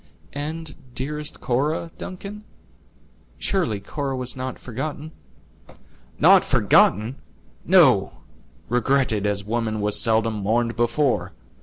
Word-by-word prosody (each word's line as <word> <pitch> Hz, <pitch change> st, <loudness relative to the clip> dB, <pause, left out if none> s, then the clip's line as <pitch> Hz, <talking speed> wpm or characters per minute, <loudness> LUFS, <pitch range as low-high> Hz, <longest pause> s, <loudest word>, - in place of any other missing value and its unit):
"And, 155 Hz, +2 st, -5 dB, 0.2 s
dearest 150 Hz, +3 st, -3 dB
Cora, 150 Hz, +6 st, -1 dB
Duncan; 200 Hz, +3 st, -8 dB, 0.9 s
surely 170 Hz, -, -1 dB
Cora 135 Hz, +6 st, -4 dB
was 125 Hz, -1 st, 0 dB
not 130 Hz, 0 st, -5 dB
forgotten?" 145 Hz, +5 st, -6 dB, 1.1 s
"Not -, -, +6 dB
forgotten! 110 Hz, +7 st, +3 dB, 0.5 s
no; -, -, +5 dB, 0.5 s
regretted, 120 Hz, -3 st, +1 dB
as 100 Hz, -1 st, -1 dB
woman 110 Hz, 0 st, -2 dB
was 105 Hz, 0 st, +2 dB
seldom 115 Hz, -1 st, +2 dB
mourned 115 Hz, +3 st, 0 dB
before. 125 Hz, +3 st, 0 dB
125 Hz, 100 wpm, -23 LUFS, 110-150 Hz, 1.1 s, Not